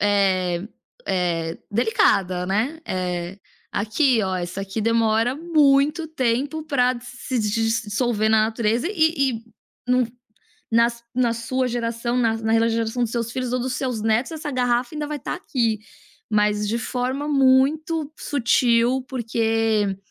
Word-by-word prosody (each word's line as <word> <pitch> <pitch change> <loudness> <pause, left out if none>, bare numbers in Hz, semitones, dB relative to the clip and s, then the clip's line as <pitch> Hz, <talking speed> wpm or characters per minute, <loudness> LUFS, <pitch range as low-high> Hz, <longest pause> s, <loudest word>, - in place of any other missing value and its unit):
eh 190 -3 +1 0.4
eh, 170 -3 -1
delicada, 190 -5 +2
né, 240 - -1
eh: 180 0 -3 0.4
"Aqui, 225 +3 +2
ó, 190 -1 -1
essa 175 +2 -4
aqui 195 +3 -4
demora 230 +2 +2
muito 305 0 +3
tempo 280 +2 -1
para 255 -4 +1
se 250 +1 -5
dissolver 225 +1 0
na 215 -1 +4
natureza, 225 +4 0
e 320 -8 +2
e 225 - -12 0.4
não 250 -1 +3 0.6
nas 235 +1 +2
na 245 -2 +2
sua 255 +3 -1
geração, 235 0 -2
na 230 -3 +2
na 225 +1 +2
geração 230 +1 -1
dos 230 - 0
seus 235 -1 -2
filhos 255 -2 -3
ou 255 - +1
dos 250 0 -2
seus 250 -4 -2
netos, 220 +6 +1
essa 305 -2 -5
garrafa 245 +2 0
ainda 300 -1 -3
vai 300 - -4
estar - - -4
aqui". 230 -4 -1 0.5
Mas 210 0 +1
de 230 - 0
forma 255 +4 -2
muito 295 +3 +2
sutil, 250 -1 +2
porque 225 -4 0
235 Hz, 135 wpm, -23 LUFS, 215-260 Hz, 0.6 s, na